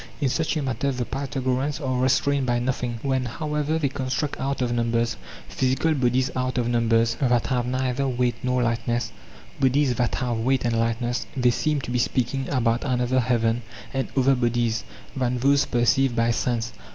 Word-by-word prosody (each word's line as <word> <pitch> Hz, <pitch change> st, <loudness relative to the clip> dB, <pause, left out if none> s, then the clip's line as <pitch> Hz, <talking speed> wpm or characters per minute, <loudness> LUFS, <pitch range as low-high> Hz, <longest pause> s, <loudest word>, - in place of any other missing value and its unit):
In 140 Hz, -4 st, +1 dB
such 160 Hz, +4 st, 0 dB
a 150 Hz, -, -1 dB
matter 130 Hz, +1 st, -1 dB
the 125 Hz, -2 st, -2 dB
Pythagoreans 135 Hz, +1 st, -2 dB
are 130 Hz, -4 st, -1 dB
restrained 135 Hz, +1 st, +2 dB
by 120 Hz, 0 st, +2 dB
nothing; 120 Hz, -1 st, -2 dB
when, 130 Hz, -2 st, 0 dB
however, 150 Hz, +4 st, -2 dB
they 150 Hz, -3 st, +1 dB
construct 140 Hz, +2 st, -2 dB
out 135 Hz, +1 st, -2 dB
of 125 Hz, -2 st, 0 dB
numbers 115 Hz, 0 st, 0 dB, 0.3 s
physical 130 Hz, +5 st, +1 dB
bodies—out 130 Hz, -1 st, 0 dB
of 120 Hz, -1 st, +1 dB
numbers 115 Hz, -1 st, +2 dB
that 120 Hz, -4 st, +2 dB
have 125 Hz, -2 st, 0 dB
neither 130 Hz, +1 st, 0 dB
weight 125 Hz, -1 st, +1 dB
nor 125 Hz, 0 st, +1 dB
lightness, 115 Hz, 0 st, -1 dB, 0.5 s
bodies 135 Hz, 0 st, +3 dB
that 120 Hz, 0 st, 0 dB
have 120 Hz, -3 st, -1 dB
weight 130 Hz, +2 st, +1 dB
and 115 Hz, -1 st, +1 dB
light 115 Hz, 0 st, 0 dB
ness—they 120 Hz, +1 st, 0 dB
seem 150 Hz, +3 st, 0 dB
to 125 Hz, -, -6 dB
be 125 Hz, -, +1 dB
speaking 130 Hz, +2 st, -1 dB
about 120 Hz, -3 st, +1 dB
another 125 Hz, -1 st, +1 dB
heaven 120 Hz, -1 st, +1 dB, 0.3 s
and 135 Hz, -1 st, -1 dB
other 135 Hz, +1 st, +4 dB
bodies 120 Hz, -2 st, 0 dB, 0.3 s
than 125 Hz, -2 st, 0 dB
those 140 Hz, +3 st, +3 dB
perceived 120 Hz, +1 st, +2 dB
by 115 Hz, 0 st, +2 dB
sense. 115 Hz, -1 st, -1 dB
125 Hz, 175 wpm, -24 LUFS, 120-135 Hz, 0.5 s, other